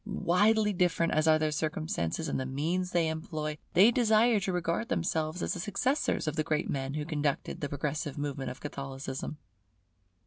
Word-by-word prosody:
Widely 210 +1 +2
different 175 -2 +1
as 155 +1 +2
are 155 0 +6
their 155 -1 0
circumstances 155 - -2
and 140 - -1
the 130 - -2
means 165 +7 -1
they 170 -2 +2
employ, 160 -2 -4
they 200 +7 +7
desire 225 -1 +4
to 195 - -2
regard 180 +6 -1
themselves 165 -5 -1
as - - 0
the - - -5
successors 205 - 0
of 155 - -1
the 155 - +1
great 155 0 0
men 135 0 -2
who 150 -1 -2
conducted 145 -3 -2
the 145 - -2
progressive 145 +1 -3
movement 140 -2 -3
of 125 - -8
Catholicism. 135 0 -5
160 Hz, 175 wpm, -30 LUFS, 145-185 Hz, -, they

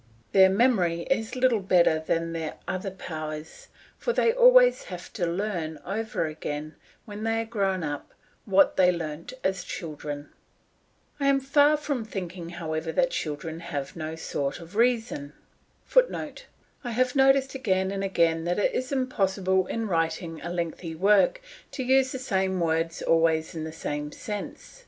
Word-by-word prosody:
Their 190 -1 +7
memory 190 -6 +2
is 225 -2 0
little 255 -3 +3
better 180 -4 +3
than 165 +1 -1
their 160 -2 -4
other 185 +1 -2
powers, 155 -4 -7 0.3
for 480 - 0
they 460 - +3
always - - +6
have - - -8
to 175 -5 -1
learn 170 -3 -2
over 220 -3 -2
again, 155 0 -5 0.3
when 210 0 -7
they 225 0 +1
are - - -4
grown 195 -5 -1
up, 145 -1 -5 0.3
what 195 -1 +4
they 180 -1 +6
learnt 165 0 -5
as 190 -1 0
children. 150 -4 -6 0.9
I 280 - +1
am 275 0 +4
far 285 +3 +4
from 285 -5 -2
thinking, 180 -5 -6
however, 160 -1 -3
that 260 -1 +2
children 160 +1 -4
have 145 -5 -5
no 160 -1 -5
sort 140 -3 -3
of 170 +3 -12
reason. 225 - +1 0.5
[Footnote: - - +1 0.4
I 245 - -4
have 255 +2 +1
noticed 270 0 +4
again 190 -8 0
and 195 0 -3
again 170 -4 +2
that 175 +1 0
it 205 - +1
is 255 +1 -2
impossible 190 -8 +1
in 225 -1 -2
writing 165 -2 -1
a 170 - -5
lengthy 170 -1 -4
work 200 - +3 0.3
to 265 - -3
use 260 +1 +3
the - - -3
same 190 -7 0
words 165 0 0
always 165 -1 +2
in 160 -1 -4
the 160 - -5
same 150 -2 -4
sense. 210 - -7
185 Hz, 160 wpm, -26 LUFS, 165-230 Hz, 0.9 s, Their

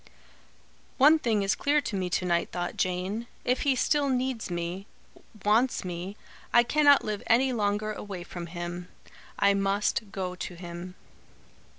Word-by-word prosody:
"One 300 +4 +7
thing 220 -7 +1
is 195 - +2
clear 290 +1 +2
to 225 - -4
me 185 -2 -1
to 180 - 0
night," 170 -1 +1
thought 175 -1 -3
Jane. 185 +6 -2 0.2
"If 250 +1 +1
he 275 -2 +2
still 285 +2 +2
needs 255 -4 -1
me 175 +3 -4 0.6
wants 225 +2 +2
me 180 +3 -5 0.3
I 240 - +6
cannot 285 +2 +5
live 210 -2 -3
any 255 +3 +4
longer 210 -1 0
away 200 -4 -7
from 175 -1 -7
him. 175 +1 -6 0.5
I 200 - +4
must 200 +1 0
go 185 -2 -3
to 180 0 -6
him." 175 +1 -8
200 Hz, 155 wpm, -28 LUFS, 180-240 Hz, 0.6 s, One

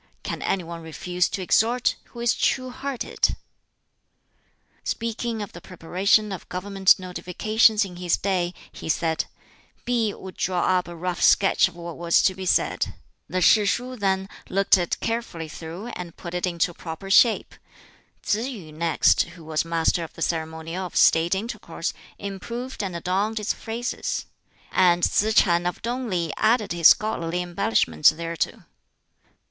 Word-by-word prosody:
Can - - -4
any 190 -2 0
one 170 0 -7
refuse 175 +2 -1
to 190 - -4
exhort, 235 +6 +2
who 240 - -10
is 235 0 +3
true 255 -1 0
hearted?" 265 0 -1 1.5
Speaking 230 -1 -3
of 205 - -9
the 175 - -10
preparation 190 +4 +1
of 190 - -7
Government 195 +1 +3
Notifications 210 +4 +2
in 180 -2 -10
his 180 -1 +1
day 180 -3 -1 0.2
he - - -8
said, 160 0 0 0.6
"P'i 230 -4 0
would 190 -1 -10
draw 180 -1 0 0.2
up 180 - -7
a 175 - -8
rough 175 +1 -3
sketch 195 - +5
of - - -12
what 170 -1 -8
was 170 -1 +3
to 190 - +3
be 185 0 -6
said; - - +1 0.3
the 185 - -1
Shishuh 235 +6 +3
then 195 -3 0 0.2
looked 195 +2 +4
it 175 -3 -1
carefully 225 -8 -3
through 165 +8 -8
and 175 -7 -8
put 170 - -8
it 180 +1 -1
into 170 0 0
proper 165 +4 -7
shape; 230 +3 +4 0.7
Tsz 225 +5 0
yu 190 - -9
next, 160 +1 +3 0.2
who 165 - -12
was 155 -1 0
master 165 +1 +1
of 160 - -9
the 165 - -4
ceremonial 160 +2 -3
of - - -16
State 165 +3 +4
intercourse, 220 +5 -4 0.2
improved 235 +7 -5
and 190 -3 -4
adorned 195 +6 -1
its 210 - -1
phrases; 235 +2 -4 0.5
and 175 -2 +4
Tsz 215 +1 +2
ch'an 175 -1 +4
of 180 - -3
Tung 245 +1 -2
li 170 -4 -1
added 220 -1 +2
his 170 -2 +6
scholarly 180 -5 +2
embellishments 175 - +3
thereto." 165 0 -3
185 Hz, 155 wpm, -24 LUFS, 170-215 Hz, 1.5 s, his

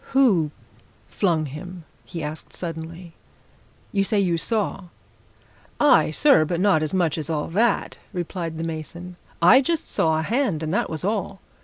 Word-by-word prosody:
"Who 210 - +4 0.6
flung 165 -6 +1
him?" 175 +5 -8 0.2
he 165 -2 -7
asked 150 +1 -6
suddenly. 165 0 -7 0.8
"You 195 -1 +2
say 205 +1 +1
you 180 -4 +2
saw!" 200 +1 -1 0.9
"Aye, 285 - +5
sir, 270 - +4
but 170 +2 -2
not 185 -5 +3
as 155 - -2
much 170 -4 +1
as 155 - -5
all 150 -2 -2
that!" 220 +8 +1
replied 170 -2 -4
the 165 - -3
mason. 170 +2 -6 0.3
"I 250 +10 +8
just 325 +4 -2
saw 160 -1 +2
a 160 - -1
hand 210 - 0
and 155 +2 -2
that - - 0
was 160 0 -4
all. 200 -1 -2
175 Hz, 160 wpm, -23 LUFS, 160-200 Hz, 0.9 s, I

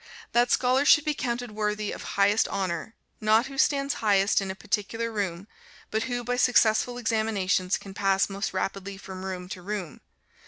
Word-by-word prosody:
That 240 +1 +3
scholar 255 +3 +3
should 295 +1 +6
be 305 - +1
counted 245 -3 -3
worthy 210 0 -2
of - - -7 0.2
highest 200 +2 +4
honor, 190 +1 -3 0.2
not 220 +2 +3
who 275 0 -7
stands 280 0 +2
highest 200 -2 +3
in 195 - -4
a 190 - -4
particular 225 +4 -2
room, 195 -3 -3 0.4
but 220 +1 0
who 245 0 -3
by 245 +1 -1
successful 245 -1 +3
examinations 210 -5 0
can 195 - -11
pass 195 -1 +2
most 200 +1 -3
rapidly 195 0 -3
from 190 -1 -9
room 185 -1 -5
to 185 - -7
room. 190 -4 -5
210 Hz, 170 wpm, -27 LUFS, 195-240 Hz, 0.4 s, should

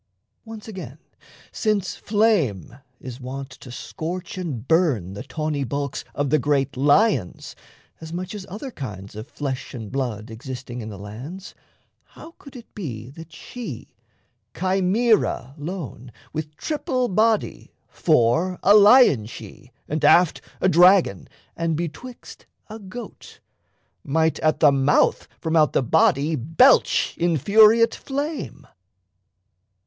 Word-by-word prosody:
Once 225 -1 -10
again, 195 -4 -8 0.5
since 210 -4 -1
flame 185 - 0 0.2
Is 125 0 -9
wont 135 +2 -7
to 125 - -12
scorch 170 +7 -6
and 145 - -5
burn 145 - +1
the 100 - -7
tawny 150 +1 -3
bulks 140 +2 -4
Of 140 -2 -1
the 155 - +4
great 140 0 0
lions 145 - +1 0.4
as 160 0 -9
much 180 +3 -5
as 205 -2 -7
other 220 +8 -7
kinds 105 - -8
Of 110 +3 -8
flesh 135 -4 -5
and 110 -4 -8
blood 120 -5 -4
existing 125 +1 -7
in 110 - -7
the 100 - -8
lands, 125 - -9 0.5
How 330 - -14
could 280 -1 -14
it 240 -2 -13
be 125 - -7
that 165 +3 -12
she, 245 -2 -9 0.6
Chimaera 190 - +1
lone, 145 - -7 0.2
With 155 -1 -6
triple 290 -5 -2
body 220 +2 0 0.2
fore, 160 +5 +1
a 205 - +6
lion 210 - +6
she; 125 +2 -12 0.2
And 155 +1 -3
aft, 175 -2 +4 0.2
a - - +2
dragon; 180 - +4 0.3
and 165 -1 -1
betwixt, 175 +10 -8 0.2
a 220 - -8
goat 210 +4 -10 0.6
Might 160 +2 0
at 155 0 0
the 150 -3 +7
mouth 140 +1 +2
from 160 -1 -2
out 155 -2 +4
the - - +2
body 140 +6 +2
belch 165 - +3
Infuriate 210 - +4
flame? 280 - -5
160 Hz, 130 wpm, -23 LUFS, 130-200 Hz, 0.6 s, the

